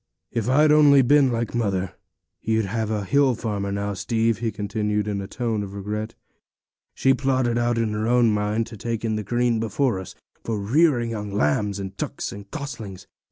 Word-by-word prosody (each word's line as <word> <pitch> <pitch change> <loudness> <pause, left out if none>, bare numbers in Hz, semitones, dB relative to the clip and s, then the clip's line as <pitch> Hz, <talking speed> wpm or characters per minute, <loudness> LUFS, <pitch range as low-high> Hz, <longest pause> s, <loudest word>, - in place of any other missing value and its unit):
'If 115 0 -1
I'd 150 +3 +5
only 145 -3 +6
been 140 0 +4
like 115 0 -2
mother, 95 -6 -1 0.5
you'd 110 -1 +1
have 110 +2 -2
been 110 0 -1
a 105 - -3
hill 140 +3 +3
farmer 100 -3 -3
now, 100 0 -2
Steve,' 110 +2 0
he 115 -1 -1
continued, 105 0 -2
in 100 -1 -2
a 95 - -6
tone 115 -1 -2
of 100 -1 -7
regret; 105 +2 -4 0.8
'she 135 - +3
plotted 130 -3 +1
out 120 0 +1
in 115 -1 +1
her 105 +1 -1
own 120 -1 +4
mind 105 +2 0
to 115 -1 -10
take 115 +1 -3
in 110 -1 0
the 105 - -2
green 120 +2 +1
before 115 0 0
us, 95 - -9 0.3
for 115 -2 -2
rearing 120 +2 +2
young 105 -2 -4
lambs, 100 +3 0
and 95 -1 -6
ducks, - - -4
and 100 0 -10
goslings. 115 - -7
110 Hz, 195 wpm, -23 LUFS, 100-120 Hz, 0.8 s, only